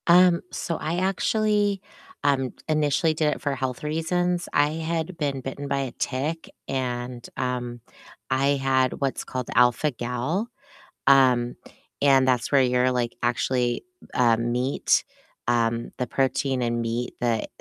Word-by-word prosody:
Um, 175 0 +6
so 165 - -3
I 165 +3 -2
actually, 205 +1 +1 0.4
um, 135 -3 +1
initially 155 +1 +2
did 155 -1 +1
it - - -11
for 140 -1 -1
health 130 0 -3
reasons. 175 +3 0
I 145 0 +4
had 165 +2 -3
been 140 -4 -2
bitten 135 +2 -5
by 140 0 0
a 135 -2 -2
tick 145 +5 -3 0.2
and, 125 -2 -3
um, 125 -2 -3 0.5
I 135 +1 +2
had 130 -1 +2
what's 135 -2 -1
called 130 -1 -5
alpha-gal. 125 - +1 0.6
Um, 125 -3 +5 0.5
and 135 -2 +5
that's 125 -2 +1
where 140 -2 +5
you're, 125 0 +3
like, 120 -2 -1
actually, 120 0 0 0.3
uh, 120 -3 +4
meat, 120 +3 +1 0.4
um, 115 -1 +1
the 125 - -2
protein 135 0 0
in 120 -1 0
meat, 115 +1 -2
the, 115 -2 0
135 Hz, 135 wpm, -25 LUFS, 125-155 Hz, 0.6 s, Um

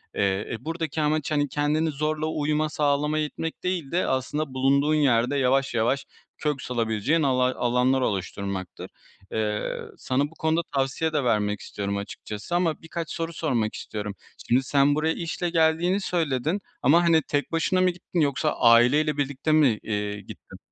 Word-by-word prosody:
Eee, 100 0 0
e, 115 - -2
buradaki 160 -2 -2
amaç, 150 0 0
hani, 145 -1 +2
kendini 150 +3 0
zorla 155 +2 -1
uyuma 155 0 0
sağlamaya 150 +1 +1
itmek 160 +2 -6
değil 180 -6 -2
de 180 - +1
aslında 130 +2 -2
bulunduğun 140 +3 +2
yerde 135 -2 +2
yavaş 135 0 +2
yavaş 120 +4 +1 0.3
kök 150 -3 -2
salabileceğin 120 +6 0
alay 130 -1 +2
alanlar 125 +2 +2
oluşturmaktır. 100 -3 -3 0.4
Eee, 105 -1 -2 0.2
sana 130 +2 0
bu 165 - -18
konuda 160 +1 +2
tavsiye 135 +4 0
de 145 -3 +1
vermek 105 -3 +1
istiyorum 100 0 -4
açıkçası 105 +8 -6
ama 170 -3 0
birkaç 165 0 -5
soru 165 0 -3
sormak 125 -10 -1
istiyorum. 105 -2 -5 0.3
Şimdi 130 +3 +3
sen 140 +1 +3
buraya 160 +1 +1
işle 175 +1 -3
geldiğini 165 +4 +2
söyledin 160 +1 -1 0.2
ama, 165 +7 +5
hani, 165 -2 +4
tek 145 +1 -2
başına 170 +3 +1
mı 185 - +4
gittin, 175 0 -4
yoksa 140 -5 +1
aileyle 125 +6 +5
birlikte 145 +2 -1
mi, 140 -9 +4
eee, 105 -1 -3
gittin? - - -12
145 Hz, 155 wpm, -25 LUFS, 120-160 Hz, 0.4 s, ama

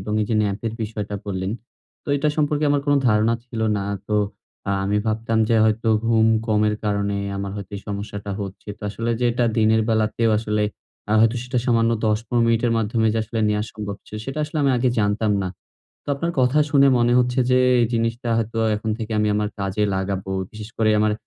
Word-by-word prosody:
এবং 105 +2 -5
এই - - -2
যে, 110 - +2
ন্যাপের 105 +2 -2
বিষয়টা 105 -1 -4
বললেন। 95 -1 -2 0.5
তো - - -11
এটা 145 +2 +1
সম্পর্কে 150 0 +1
আমার 145 0 +2
কোন 145 - +4
ধারণা 110 +2 +3
ছিল 115 -2 -6 0.2
না। 100 - -2 0.2
তো 105 - +1 0.7
আমি 105 +1 0
ভাবতাম 110 +1 0
যে 115 - +3
হয়তো 110 +1 +1 0.2
ঘুম 110 -1 +4 0.2
কমের 105 -1 +2
কারণে 100 -1 0 0.2
আমার 100 0 -4
হয়তো 100 -2 -7
এই - - -7
সমস্যাটা 100 0 -5
হচ্ছে। 100 +1 -7
তো - - -19
আসলে 115 +4 -3
যে 125 - +1
এটা 120 +1 +1
দিনের 110 0 +4
বেলাতেও 110 +1 +1
আসলে 105 -1 -1 0.6
হয়তো 115 +2 +3
সেটা 125 0 -2
সামান্য 115 -2 +3 0.2
১০ 105 0 +2
১৫ 120 -1 +1
মিনিটের 115 0 +2
মাধ্যমে 110 +1 +1
যে 115 - 0
আসলে 115 +1 -3
নেয়া 105 0 +1
সম্ভব 100 -2 -5
ছিল। 105 - -8
সেটা 135 +3 -4
আসলে 150 +1 -4
আমি 140 - +3
আগে 125 +1 +2
জানতাম 105 +1 +1
না। 95 - -2 0.6
তো - - -15
আপনার 170 +5 -2
কথা 130 +4 +3
শুনে 140 -2 +5
মনে 120 0 +3
হচ্ছে 125 +1 +1
যে 125 - +5 0.2
এই 115 - +3
জিনিসটা 115 +2 -1
হয়তো 115 0 -2 0.2
এখন 110 +1 -3
থেকে 110 0 -5
আমি 105 0 +2
আমার 105 0 0
কাজে 100 +2 -1
লাগাবো। 95 0 -3 0.2
বিশেষ 105 -1 -9
করে 110 -1 +3
আমার 105 0 +2
110 Hz, 200 wpm, -22 LUFS, 105-120 Hz, 0.7 s, শুনে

